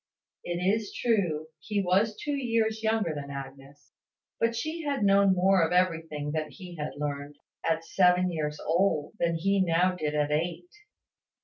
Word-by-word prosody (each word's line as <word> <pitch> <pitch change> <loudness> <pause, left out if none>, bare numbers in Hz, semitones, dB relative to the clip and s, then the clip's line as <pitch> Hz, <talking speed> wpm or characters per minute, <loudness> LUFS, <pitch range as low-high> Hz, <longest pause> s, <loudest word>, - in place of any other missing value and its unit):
It 175 0 -3
is 200 +4 0
true, 175 -10 0
he 205 +6 -2
was 200 +3 +2
two 295 - -4
years 230 -4 0
younger 220 -6 +1
than 145 -1 -6
Agnes: 140 +1 -10 0.5
but 230 0 +1
she 315 +7 -3
had 280 -6 -1
known 195 -1 +5
more 190 +1 +4
of 165 - 0
everything 165 -5 0
that 155 -1 -3
he 180 -3 -10
had 150 -1 -4
learned, 145 0 -4 0.3
at 165 0 0
seven 180 0 +3
years 150 -2 -3
old, 165 -3 +1
than 170 -1 +1
he 195 +4 +1
now 180 +1 +2
did 155 -4 -3
at 150 0 +1
eight. 170 - -2
180 Hz, 165 wpm, -28 LUFS, 150-200 Hz, 0.5 s, known